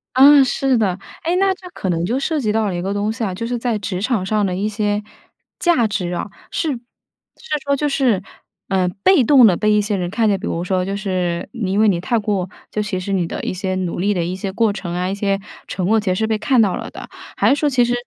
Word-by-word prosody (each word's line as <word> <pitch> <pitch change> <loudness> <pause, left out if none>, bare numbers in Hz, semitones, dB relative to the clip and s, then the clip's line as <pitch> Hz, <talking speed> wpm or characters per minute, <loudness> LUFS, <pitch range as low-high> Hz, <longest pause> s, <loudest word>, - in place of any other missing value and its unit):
啊， 280 +2 +8
是 265 0 +1
的。 195 -5 +1 0.3
哎， 340 +2 +1
那 390 0 +3
这 370 -1 -12
可 190 - -3
能 170 -1 0
就 245 +8 0
涉 310 +3 -1
及 220 -6 0
到 220 0 +1
了 190 - -2
一 175 - -2
个 195 +2 -2
东 205 +1 -1
西 225 +1 -4
啊， 195 -4 -1
就 210 +5 -4
是 245 +1 -2
在 235 -2 -1
职 195 -3 -4
场 220 -4 0
上 210 +1 +1
的 185 -2 -1
一 200 +3 -1
些 210 0 -1 0.6
价 335 -11 +3
值 185 -4 -2
啊， 175 - -3 0.2
是 310 -3 -1
是 245 - -6 0.9
说 280 0 +2
就 295 +2 0
是， 250 -9 +1 0.5
呃， 190 -2 +2 0.2
被 370 -9 +5
动 260 0 +7
地 190 -5 +5
被 215 +4 +1
一 210 - +4
些 205 0 -1
人 180 -2 -2
看 220 +4 +1
见， 200 -2 +2
比 210 - -4
如 170 - -2
说 185 0 0
就 195 +2 -3
是 185 -4 -2
你 215 -6 -2
因 200 - +1
为 220 - +5
你 185 -4 +2
太 230 +7 0
过 200 -4 -1 0.2
就 210 - -1
其 205 -3 -2
实 195 +2 -3
你 180 -3 +1
的 - - -5
一 - - -2
些 185 0 -2
努 185 -2 -3
力 200 +3 +1
的 175 -3 -1
一 175 +2 -3
些 190 +1 -4
过 220 +1 +1
程 175 -4 -5
啊、 180 +1 -1
一 - - -1
些 200 -1 0 0.3
成 180 -2 -2
果 220 +2 +4
其 210 - -6
实 - - +1
是 220 +3 0
被 220 -1 +1
看 235 +3 +3
到 200 -4 +2
了 - - -6
的。 - - -9 0.3
还 - - +3
是 - - +2
说 300 - +2
其 250 -3 +3
实， 240 - 0
210 Hz, 290 characters per minute, -19 LUFS, 185-235 Hz, 0.9 s, 啊